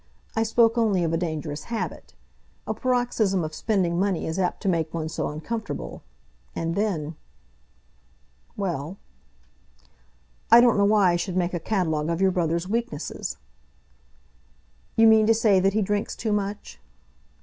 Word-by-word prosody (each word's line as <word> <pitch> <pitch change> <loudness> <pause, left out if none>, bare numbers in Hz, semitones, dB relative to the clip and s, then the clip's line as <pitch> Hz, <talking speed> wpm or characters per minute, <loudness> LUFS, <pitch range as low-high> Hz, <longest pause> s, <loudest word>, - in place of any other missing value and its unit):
I 225 - +1
spoke 230 +1 +3
only 205 -6 +2
of 165 -1 0
a - - +3
dangerous 155 -3 -4
habit. 230 -1 -5 0.5
A - - -2
paroxysm 245 -7 0
of 155 0 -5
spending 180 -3 0
money 195 -2 0
is 160 +4 -3
apt 180 +3 -1
to - - -2
make 165 -4 0
one 160 -1 -3
so 165 - -2
uncomfortable. 155 - -5 0.5
And 165 0 -2
then 170 -6 -2 0.7
" - - -37
"Well." 175 -3 -3 1.5
"I 235 - +9
don't 240 -3 +4
know 200 - +4
why 200 -3 +4
I 175 - +1
should 180 +1 -3
make 180 0 0
a 175 - -1
catalogue 160 -5 -1
of 170 0 -1
your 190 0 +3
brother's 170 0 -1
weaknesses." 235 +4 -3 1.6
"You 225 - +5
mean 220 -1 +6
to 225 - +5
say 215 -4 +4
that 195 +1 +2
he 215 0 +2
drinks 205 +1 -2
too 220 - -2
much?" 205 0 -4
190 Hz, 155 wpm, -25 LUFS, 165-220 Hz, 1.6 s, I